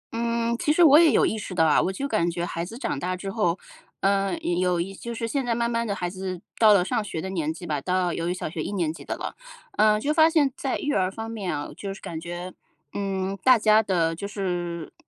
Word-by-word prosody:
嗯， 235 0 0
其 300 - +1
实 345 +3 +5
我 300 -1 +8
也 330 -3 +6
有 - - +4
意 220 - -1
识 190 -3 -6
到 165 -2 +4
啊， 155 - +4
我 190 - 0
就 270 +9 -3
感 215 -9 +1
觉 170 0 -3
孩 170 -1 -4
子 220 +7 -8
长 245 - -3
大 180 +4 -2
之 195 +1 -5
后， 190 -6 +1 0.4
嗯， 195 -1 +1 0.2
有 180 -1 +1
一 195 +3 -3
就 235 +4 -7
是 230 0 -3
现 270 +3 -1
在 235 -1 0
慢 235 0 0
慢 230 -1 -1
地 200 - -1
孩 180 - -2
子 185 0 -5 0.2
到 220 -2 +7
了 195 -3 +5
上 215 - 0
学 200 - -5
的 190 +4 -4
年 160 -4 -1
纪 170 +2 -8
吧， 150 -4 -2
到 180 0 0
由 165 +1 -2
于 - - 0
小 185 - -4
学 160 0 -5
1 - - -4
年 170 -5 0
级 - - -11
的 - - -4
了， - - -5 0.4
嗯， 210 0 +4
就 295 +6 0
发 315 0 +6
现 290 -5 +2
在 270 - -2
育 290 - -2
儿 185 -1 +1
方 225 +2 -6
面 200 -8 -3
啊， 145 - -6
就 200 - -5
是 - - -12
感 160 -1 -6
觉， 175 +1 -6 0.4
嗯， 195 -1 -2
大 255 -1 +7
家 215 0 +5
的 175 -6 +1
就 200 +5 -5
是 175 -5 -4
195 Hz, 275 characters per minute, -25 LUFS, 175-230 Hz, 0.4 s, 我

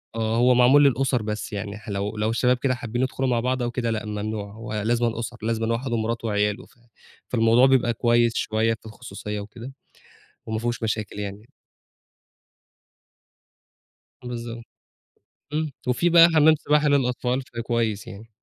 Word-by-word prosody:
آه، 115 0 0
هو 125 +1 +4
معمول 130 +4 +6
للأسر، 135 -2 +2
بس 105 0 -4
يعني 100 +1 -5
ح 110 0 -12
لو، 100 +2 -3
لو 105 +1 0
الشباب 125 +2 +2
كده 130 -1 0
حابين 120 -1 -4
يدخُلوا 130 0 -1
مع 120 -1 +2
بعض 125 +1 -1
أو 120 - -2
كده، 120 -2 -2
لأ 110 -1 -3
ممنوع، 105 -1 -4
هو 110 -1 -8
لازمًا 115 +2 0
أُسر، 115 +1 -5
لازمًا 115 0 0
واحد 120 +1 -3
ومراته 115 0 -2
وعياله، 105 +2 0
ف - - -25 0.5
فالموضوع 115 +1 +4
بيبقى 125 -3 +3
كويس 120 0 +2
شوية 110 +1 +1
في 110 - -26
الخصوصية 110 -2 -7
وكده، 115 +6 -9 0.7
وما 110 0 -3
فيهوش 120 -1 -3
مشاكل 105 -2 -3
يعني. 100 +2 -7 2.8
بالضبط 115 -1 -6 0.9
إمم 155 -1 -1 0.2
وفيه 170 +8 +2
بقى 170 0 +8
حمام 155 +1 +6
سباحة 150 0 +1
للأطفال 125 -2 +1
فده 120 -3 -7
كويس 115 -3 -1
يعني. 110 +3 -11
115 Hz, 155 wpm, -24 LUFS, 110-125 Hz, 2.8 s, بقى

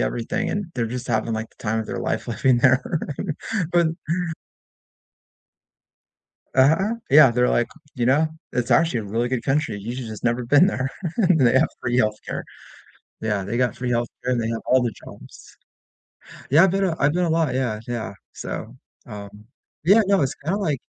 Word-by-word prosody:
everything, 115 - -1
and 205 -2 -2
they're 120 -2 -1
just 125 +2 -5
having, 110 +1 0
like, 110 0 -3
the - - -19
time 110 0 0
of 110 - -5
their - - -4
life - - -2
living 130 -2 +2
there, 130 +1 +4 0.9
but 170 -2 +4 2.7
Uh-huh. 160 - +4 0.2
Yeah, 140 -3 +8
they're 125 +1 +2
like 120 - +1 0.3
you 120 -2 -1
know, 150 +5 +4 0.3
it's 125 -1 -1
actually 165 -8 +3
a 105 - -7
really 115 +4 -1
good 120 -2 -2
country. 145 -6 0
You 115 +5 -5
j 130 - -5
just 110 0 -8
never 120 +1 +1
been 145 +9 +5
there. 135 -8 -1 0.5
They 125 -3 +4
have - - +3
free 120 0 -1
health 110 -3 +2
care. - - -4 0.8
Yeah, 105 -3 0
they 115 +4 -3
got 125 -3 +1
free 125 0 -4
healthcare, 120 0 +1 0.2
and 125 -2 +1
they 110 - -2
have 115 0 -2
all 130 0 +4
the 120 -3 -1
jobs. - - -13 0.9
Yeah, 155 +6 +7
I've 190 - +3
been 195 +1 +1
a 170 -3 0
I've 145 +1 +3
been 180 +1 +1
a 165 - 0
lot 160 -5 +1
Yeah, 125 -5 -1
yeah, 115 -5 -4 0.2
so, - - -6 0.3
um 100 -1 -8 0.5
Yeah, 200 +6 +6
no, 195 -6 +4
it's 135 - -1
kinda 170 +7 -3
like 150 -10 -1
125 Hz, 185 wpm, -23 LUFS, 115-150 Hz, 2.7 s, Yeah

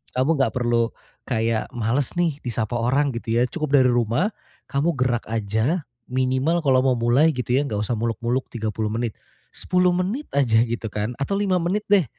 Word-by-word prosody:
Kamu 130 +6 +2
enggak 135 - +2
perlu 120 -2 +1 0.4
kayak 115 -2 0
males 120 +4 0
nih 165 -5 +1
disapa 120 -1 -2
orang 135 +5 +2
gitu 115 -1 -3
ya - - +4
cukup 155 -2 -3
dari 130 - +4
rumah, 120 - +1 0.4
kamu 145 +5 +1
gerak 125 -2 +1
aja 110 - 0 0.3
minimal 130 +6 +1
kalau 130 -3 +4
mau 130 - +4
mulai 125 +7 +4
gitu 125 0 -1
ya 140 - +2
enggak 105 -5 -2
usah 110 +3 -1
muluk-muluk 115 +3 -1
30 110 -2 -2
menit, 115 -1 -2 0.4
10 180 0 +2
menit 200 +11 -2
aja 115 -5 +4
gitu 115 0 -4
kan 105 +4 -3
atau 140 - -1
5 195 -3 +2
menit 185 +5 0
deh, 200 -3 +6
125 Hz, 175 wpm, -23 LUFS, 115-150 Hz, 0.4 s, deh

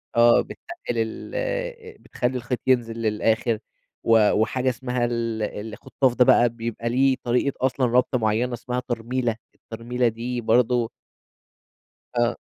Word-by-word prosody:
آه 120 0 +6
بتّقِّل - - -9 0.4
ال 110 - -3 0.6
بتخلّي 125 +1 -2
الخيط 120 0 -3
ينزل 120 -3 +2
للآخر 110 0 +1 0.4
و 115 -2 +5
وحاجة 125 +4 +1
اسمها 125 0 -1
ال 115 -2 -2 0.3
الخُطّاف 130 +2 0
ده 125 - +5
بقى 120 -2 +5
بيبقى 115 0 -4
ليه 130 +2 +3
طريقة 125 +3 +1
أصلًا 130 0 +1
ربطة 125 +1 +2
مُعينة 115 +3 0
اسمها 125 +1 -3
ترميلة، 120 0 -1 0.2
الترميلة 120 +2 -2
دي 120 +2 -3
برضه 120 +1 +2 1.3
آه. 120 0 +2
120 Hz, 125 wpm, -24 LUFS, 115-125 Hz, 1.3 s, آه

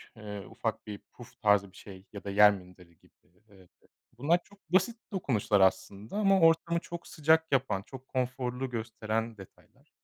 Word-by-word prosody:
eee, 105 -2 -8
ufak - - -4
bir 105 -1 -6
puf 120 - -15
tarzı 105 -3 +3
bir - - -18
şey 95 -1 -12
ya 100 - -8
da 100 - -5
yer 105 +1 +7
minderi 90 -2 -13
gibi. - - -27 0.4
İii, 95 -3 -19 0.5
bunlar 160 +7 +3
çok 205 0 -21
basit 210 +7 +2
dokunuşlar 115 - +1
aslında 95 - 0
ama 195 -2 +4
ortamı 165 0 +4
çok 170 0 -9
sıcak 160 +1 +2
yapan 130 -8 +1
çok 130 +4 -12
konforlu 125 0 -2
gösteren 115 -1 -3
detaylar. 95 - -17
115 Hz, 160 wpm, -30 LUFS, 100-155 Hz, 0.5 s, yer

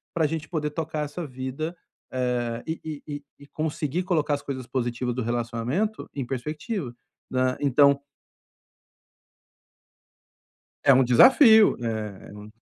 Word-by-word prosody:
pra 160 -2 +2
gente 160 +1 -4
poder 150 -3 -1
tocar 155 0 -3
essa 160 +4 -6
vida, 130 +3 -5 0.5
eh, 120 -2 -1
e 160 - -1
e 155 -2 -6
e 145 - -8 0.2
e - - -15
conseguir 155 +2 -2
colocar 155 -5 +1
as 140 - -8
coisas 130 -3 -5
positiva 125 -1 -2
do 125 - -3
relacionamento 120 - -2
em 135 -3 -3
perspectiva, 150 - -4 0.4
né. 130 0 +1
Então 140 0 +4 2.8
É 135 - +8
um 130 - +5
desafio, 220 - +7
né? 110 -4 -4
É - - -12
um 105 - -10
140 Hz, 135 wpm, -25 LUFS, 125-155 Hz, 2.8 s, É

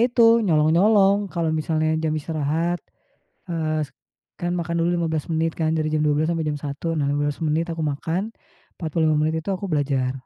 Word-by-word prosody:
itu, 240 0 +2 0.2
nyolong-nyolong, 195 +5 +4
kalau 170 -3 -1
misalnya 155 0 0
jam 160 -1 0
istirahat, 160 +3 -1 0.7
eee, 155 -2 -1 0.6
kan 175 0 -1
makan 170 0 -3
dulu 165 - +2
15 160 -3 -1
menit 165 +1 +1
kan 160 -1 0
dari 155 -1 0
jam 155 - +1
12.00 150 +1 +2
sampai 165 -1 -1
jam 150 -1 -2
1.00, 145 +4 -3
nah 140 -1 0
15 145 0 -1
menit 165 +2 0
aku 165 - -5
makan, 160 +8 -2 0.5
45 160 -1 +1
menit 155 +1 +1
itu - - -8
aku 195 - -8
belajar. 135 -3 +1
160 Hz, 170 wpm, -23 LUFS, 150-170 Hz, 0.7 s, nyolong-nyolong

